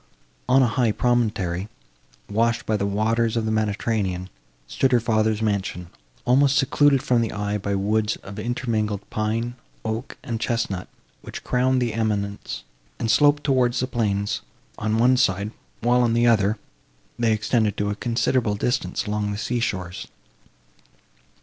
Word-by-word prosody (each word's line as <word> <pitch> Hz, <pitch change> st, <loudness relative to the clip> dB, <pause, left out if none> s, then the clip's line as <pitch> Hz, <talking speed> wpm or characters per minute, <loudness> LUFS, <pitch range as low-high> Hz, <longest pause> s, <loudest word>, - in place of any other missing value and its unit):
On 130 Hz, +1 st, +6 dB
a -, -, +4 dB
high 120 Hz, -1 st, +1 dB
promontory, 105 Hz, -6 st, 0 dB, 0.6 s
washed 115 Hz, +3 st, +1 dB
by 110 Hz, -, +1 dB
the 100 Hz, -1 st, 0 dB
waters 115 Hz, +3 st, +1 dB
of 115 Hz, -, 0 dB
the 110 Hz, -, 0 dB
Mediterranean, 105 Hz, -4 st, -1 dB, 0.3 s
stood 130 Hz, -, +1 dB
her 125 Hz, -, +5 dB
father's 110 Hz, -1 st, +1 dB
mansion, 95 Hz, -4 st, -2 dB, 0.4 s
almost 135 Hz, +2 st, +4 dB
secluded 140 Hz, -1 st, +3 dB
from 120 Hz, -2 st, +2 dB
the 115 Hz, -, -1 dB
eye 105 Hz, 0 st, -2 dB
by 100 Hz, 0 st, -2 dB
woods 105 Hz, +2 st, +1 dB
of 100 Hz, +2 st, -8 dB
intermingled 110 Hz, -3 st, -2 dB
pine, 115 Hz, +3 st, -1 dB, 0.3 s
oak 110 Hz, +4 st, -4 dB
and 115 Hz, -1 st, -3 dB
chesnut, 115 Hz, -6 st, -2 dB, 0.3 s
which -, -, -8 dB
crowned 130 Hz, 0 st, +2 dB
the 120 Hz, -3 st, -1 dB
eminence, 105 Hz, -2 st, -2 dB, 0.3 s
and 115 Hz, -, 0 dB
sloped 145 Hz, 0 st, +4 dB
towards 125 Hz, -3 st, +2 dB
the 130 Hz, -, +1 dB
plains, 105 Hz, -5 st, -1 dB, 0.4 s
on 110 Hz, +1 st, 0 dB
one 125 Hz, +3 st, +4 dB
side; 100 Hz, -3 st, +1 dB, 0.3 s
while, 120 Hz, +1 st, +3 dB
on 120 Hz, -2 st, +2 dB
the 120 Hz, +1 st, +3 dB
other, 110 Hz, -2 st, +3 dB, 0.6 s
they 115 Hz, -1 st, +3 dB
extended 110 Hz, -1 st, +1 dB
to 105 Hz, 0 st, 0 dB
a -, -, -3 dB
considerable 115 Hz, -1 st, 0 dB
distance 100 Hz, -4 st, -1 dB
along 105 Hz, 0 st, -1 dB
the 100 Hz, -, -3 dB
sea 120 Hz, +3 st, -1 dB
shores. 95 Hz, -5 st, -3 dB
110 Hz, 150 wpm, -23 LUFS, 105-120 Hz, 0.6 s, On